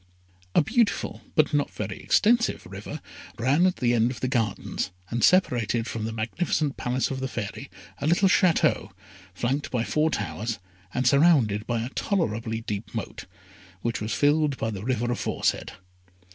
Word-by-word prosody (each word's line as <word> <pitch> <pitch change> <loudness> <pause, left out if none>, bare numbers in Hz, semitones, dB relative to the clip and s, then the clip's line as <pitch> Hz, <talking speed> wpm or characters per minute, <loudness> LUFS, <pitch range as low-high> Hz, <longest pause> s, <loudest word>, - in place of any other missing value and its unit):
A - - +6
beautiful, 230 - 0
but 155 0 +3
not 145 -1 +2
very 100 -2 -5
extensive, 235 +2 +2
river 100 +10 -7 0.4
ran 140 +10 +3
at 185 - 0
the 120 -1 +1
end 115 0 +3
of 125 -3 -6
the 130 - -1
gardens, 115 -7 -1 0.2
and 120 0 -1
separated 120 - +3
from 110 -2 -4
the 110 - -3
magnificent 140 +6 -1
Palace 125 +2 -1
of 130 - -3
the 130 - -2
Fairy 115 +2 -5 0.3
a 140 - -1
little 175 +4 +4
Château, 185 -2 +3 0.5
flanked 135 +8 -1
by 120 -3 0
four 155 +5 +1
towers, 105 - -3 0.3
and 130 +4 -1
surrounded 125 -7 +4
by 115 -2 0
a 120 - -4
tolerably 115 - -1
deep 105 -1 -5
moat, - - -5 0.6
which 115 -5 -1
was 110 +1 -3
filled 145 -1 +2
by 110 - -2
the 100 -2 -6
river 120 0 0
aforesaid. 120 - -1
125 Hz, 160 wpm, -26 LUFS, 110-150 Hz, 0.6 s, A